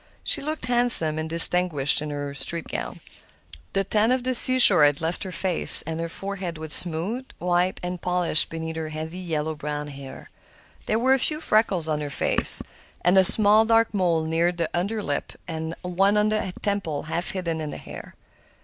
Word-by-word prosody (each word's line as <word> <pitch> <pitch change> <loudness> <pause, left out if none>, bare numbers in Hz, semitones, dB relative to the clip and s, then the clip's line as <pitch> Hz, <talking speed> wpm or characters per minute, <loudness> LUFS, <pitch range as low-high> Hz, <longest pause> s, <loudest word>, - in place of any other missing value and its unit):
She - - +2
looked 305 -3 -5
handsome 240 -11 +5
and 160 0 -5
distinguished 165 -4 +4
in 150 - -5
her 145 -1 -5
street 150 +5 -5
gown. - - -6 0.7
The 195 - 0
tan 215 +4 +1
of 255 -1 0
the 255 0 -1
seashore 245 -9 +5
had 145 -1 +3
left 165 +2 -4
her 190 - -7
face, 180 0 +4
and 160 +1 -6
her 165 0 -4
forehead 190 -2 -6
was 155 -1 -4
smooth, 185 +10 0
white, 180 +1 -1
and 180 0 -5
polished 180 -3 +1
beneath 160 0 -6
her 160 -1 -5
heavy, 160 +3 -7
yellow 160 -3 -3
brown 150 0 -6
hair. 140 -1 -11 0.6
There 215 - 0
were 260 +3 +2
a 270 - +2
few 305 +4 -1
freckles 215 - 0
on 150 -1 -2
her 145 - -5
face, 140 - +1 0.4
and 180 +2 +3
a 190 - +6
small, 210 +3 +4
dark 225 0 +2
mole 175 -5 0
near 165 +2 0
the 170 -2 -4
under 205 +5 -2
lip 145 - -4
and 160 0 -5
one 195 +3 +1
on 210 0 +2
the 215 -3 -2
temple, 200 -8 -3
half 170 +3 -4
hidden 170 -4 -4
in 150 -1 -5
her - - -7
hair. - - -11
175 Hz, 190 wpm, -23 LUFS, 160-205 Hz, 0.7 s, a